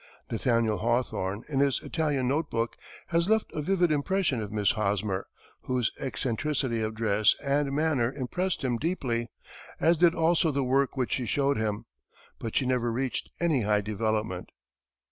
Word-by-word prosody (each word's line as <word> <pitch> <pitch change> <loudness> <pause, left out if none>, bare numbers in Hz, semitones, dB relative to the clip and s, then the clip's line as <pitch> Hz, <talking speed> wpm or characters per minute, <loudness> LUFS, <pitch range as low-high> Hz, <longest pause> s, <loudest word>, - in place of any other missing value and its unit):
Nathaniel 115 -2 +1
Hawthorne, 115 -3 -1
in 140 -3 -1
his 140 -2 +3
"Italian 145 -6 0
Note 145 +3 0
Book," 115 0 -1 0.3
has 170 +2 +1
left 220 0 +1
a 155 - -2
vivid 175 0 +2
impression 150 - +1
of 105 -1 -5
Miss 105 -1 +2
Hosmer, 100 -2 -1 0.4
whose 125 -3 0
eccentricity 130 -1 -1
of 110 0 -2
dress 110 -2 +3
and 140 0 +1
manner 140 -5 +1
impressed 150 +7 -2
him 125 -3 +1
deeply, 120 -6 -1 0.5
as 170 +1 +4
did 175 +1 +4
also 165 0 +3
the 140 -2 0
work 135 +2 +1
which 130 -2 0
she 125 -3 -1
showed 140 +2 +1
him. 105 -1 -2 0.5
But 115 - -5
she 135 - +2
never 125 -2 +1
reached 130 +2 -2
any 160 -7 +2
high 105 0 +2
development. 110 -2 -2
130 Hz, 160 wpm, -28 LUFS, 110-150 Hz, 0.5 s, as